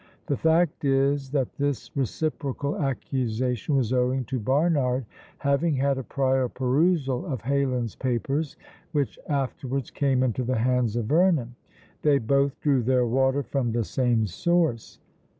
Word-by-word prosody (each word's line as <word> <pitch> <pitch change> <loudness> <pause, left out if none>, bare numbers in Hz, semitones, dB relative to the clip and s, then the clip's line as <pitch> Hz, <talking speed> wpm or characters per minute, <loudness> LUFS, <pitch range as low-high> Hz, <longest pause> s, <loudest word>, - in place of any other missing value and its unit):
The 145 - 0
fact 160 -1 +2
is, 135 0 +1
that 135 -3 -1
this 140 -4 -2
reciprocal 140 +1 -2
accusation 130 -2 -1
was 130 -3 +1
owing 125 +1 +1
to 130 +3 -3
Barnard 135 0 +1 0.3
having 140 +2 +1
had 135 0 +1
a - - -4
prior 130 +1 0
perusal 135 +1 +1
of 130 -8 -4
Heylin's 130 -4 0
papers, 135 +4 -2 0.4
which 145 -3 -1
afterwards 135 -2 -2
came 135 -3 +1
into 125 0 0
the 125 0 0
hands 125 -1 +1
of 120 -2 -1
Vernon: 155 - +2 0.5
they 145 -2 +4
both 140 +3 +1
drew 140 -4 +2
their 125 +1 +2
water 130 +3 +1
from 130 -3 -1
the 120 0 +1
same 120 -1 +1
source. 155 - 0
135 Hz, 140 wpm, -26 LUFS, 125-140 Hz, 0.5 s, they